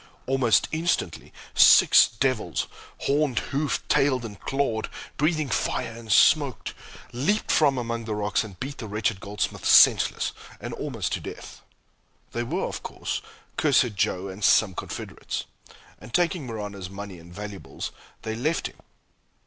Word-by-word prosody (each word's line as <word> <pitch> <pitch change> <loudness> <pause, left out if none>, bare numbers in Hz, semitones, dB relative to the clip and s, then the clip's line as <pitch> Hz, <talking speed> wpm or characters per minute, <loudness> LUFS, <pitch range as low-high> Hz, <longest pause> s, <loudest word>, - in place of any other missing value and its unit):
Almost 130 -4 +3
instantly, 160 - -1 0.2
six - - +7
devils, 115 -6 -1 0.4
horned, 140 -3 +1 0.2
hoofed, 140 -3 -1
tailed, 130 -4 +2
and 105 -4 -9
clawed, 135 -5 -1 0.3
breathing 155 0 +1
fire 115 - -1
and 115 -1 -8
smoke, 140 +3 +4 0.4
leaped 185 - 0
from 140 -4 +4
among 115 -1 -3
the 110 -1 -3
rocks 105 +1 0
and 100 -5 -11
beat 140 +2 -6
the 110 - -5
wretched 105 0 -1
goldsmith 105 +1 -3
senseless, - - +5 0.3
and - - -6
almost - - -3
to - - -1
death. - - -9 0.7
They 120 - -2
were 155 +11 -2
of - - -5
course - - -4 0.4
Cursed 130 -6 +3
Joe 95 -1 0
and 95 +2 -8
some 100 0 +5
confederates; - - -5 0.5
and - - -12
taking 170 0 +1
Marano's 105 -5 -6
money 100 -2 -8
and 85 +1 -14
valuables, 100 +1 -7 0.3
they 110 - -3
left 150 +8 -1
him. - - -7
115 Hz, 140 wpm, -25 LUFS, 105-140 Hz, 0.7 s, six